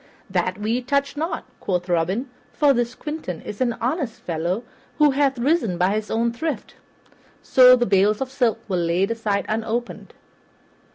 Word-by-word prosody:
"That 185 0 0
we 220 +4 -1
touch 280 +2 0
not," 320 +2 -3
quoth 180 -1 -2
Robin, 180 +9 0 0.3
"for 290 -2 +4
this 240 0 -1
Quentin 295 - -5
is 205 - -7
an 240 -2 +2
honest 250 +1 -2
fellow, 175 +6 -2 0.3
who 300 -2 +5
hath 270 -1 +1
risen 240 - +1
by 180 +3 +2
his 215 0 -3
own 230 +1 0
thrift." 315 +5 -4 0.7
So 255 -1 +7
the 240 -1 +1
bales 200 +1 +3
of 265 -1 -3
silk 245 -4 +1
were 190 -3 -1
laid 175 +4 +1
aside 215 -3 -1
unopened. 225 +2 -3
230 Hz, 160 wpm, -22 LUFS, 195-265 Hz, 0.7 s, So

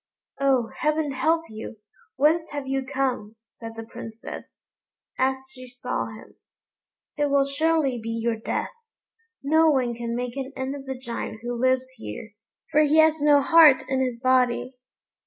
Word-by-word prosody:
"Oh! 265 -4 +2
heaven 305 -1 +1
help 315 +5 +1
you! 220 +1 -8 0.4
whence 315 +4 +2
have 290 -2 -5
you 270 0 -1
come?" 260 -5 -2
said 225 -1 -10
the 225 - -6
Princess, 225 0 -10 0.5
as 265 +1 +2
she 255 -1 -11
saw 250 0 -4
him; 220 -1 -13 0.8
"it 290 -1 +1
will 280 0 +3
surely 285 -2 +1
be 225 - -6
your 230 0 -1
death. 220 - -3 0.7
No 315 +3 +4
one 255 -5 +1
can 235 0 -4
make 245 0 -4
an 270 0 -5
end 265 +1 -3
of 275 -1 -9
the 265 -1 -4
Giant 235 -3 -6
who 240 0 -3
lives 255 +1 +1
here, 110 - -8 0.4
for 305 - +5
he 305 +1 +3
has 315 -1 +5
no 290 -1 +5
heart 315 -3 +7
in 265 0 0
his 250 -2 -3
body." 255 0 +2
260 Hz, 160 wpm, -25 LUFS, 240-285 Hz, 0.8 s, heart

